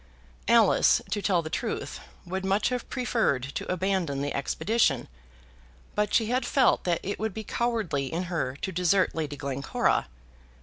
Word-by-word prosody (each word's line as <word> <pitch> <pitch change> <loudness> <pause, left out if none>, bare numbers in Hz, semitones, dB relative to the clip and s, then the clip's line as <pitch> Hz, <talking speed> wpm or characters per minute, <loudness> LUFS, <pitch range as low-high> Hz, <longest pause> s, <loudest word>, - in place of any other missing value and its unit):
Alice, - - +5
to 205 - 0
tell 180 -4 +2
the 155 - -6
truth, - - -3 0.3
would 190 +2 -3
much 195 +2 +2
have 250 -1 -3
preferred 230 - 0
to 135 +6 -4
abandon 185 -6 0
the 145 - -2
expedition, 140 - +1 0.9
but 210 -1 0
she 225 - +3
had 250 +4 0
felt 265 -2 +3
that 175 -2 +1
it 200 - -3
would 220 -3 -2
be 220 - -4
cowardly 215 - -1
in 170 +3 -1
her 165 -7 -2
to 190 - -1
desert 180 +2 +2
Lady 150 -3 -3
Glencora. 140 -1 0
185 Hz, 160 wpm, -27 LUFS, 145-215 Hz, 0.9 s, Alice